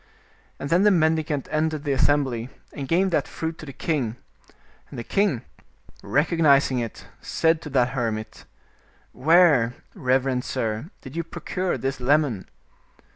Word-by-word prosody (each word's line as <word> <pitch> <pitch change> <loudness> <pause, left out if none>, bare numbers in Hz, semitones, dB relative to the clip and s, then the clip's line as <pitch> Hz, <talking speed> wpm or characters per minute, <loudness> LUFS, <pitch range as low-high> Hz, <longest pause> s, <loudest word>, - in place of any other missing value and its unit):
And 140 - -6
then 175 +2 +4
the 210 - +6
mendi 160 -4 +3
cant 145 -4 -3
entered 155 -1 0
the 145 - -1
assembly, 130 -4 +1 0.2
and 140 -2 -5
gave 185 +5 +2
that 150 -4 +1
fruit 160 0 -5
to 155 - -9
the - - -6
king, 135 -6 -2 0.7
and - - -10
the 120 - -4
king, 195 - 0 0.6
recognizing 145 -4 +3
it, 115 -2 -6 0.2
said 160 0 +1
to 150 - -7
that 130 -3 +2
hermit, 115 -4 -4 0.3
" - - -35 0.2
Where, 155 -9 +5 0.2
reverend 130 0 +1
sir, 110 +7 -3
did 130 +2 -10
you 170 - -1
procure 175 +2 -3
this 135 0 -3
lemon?" 130 -6 +1
145 Hz, 150 wpm, -24 LUFS, 125-160 Hz, 0.7 s, the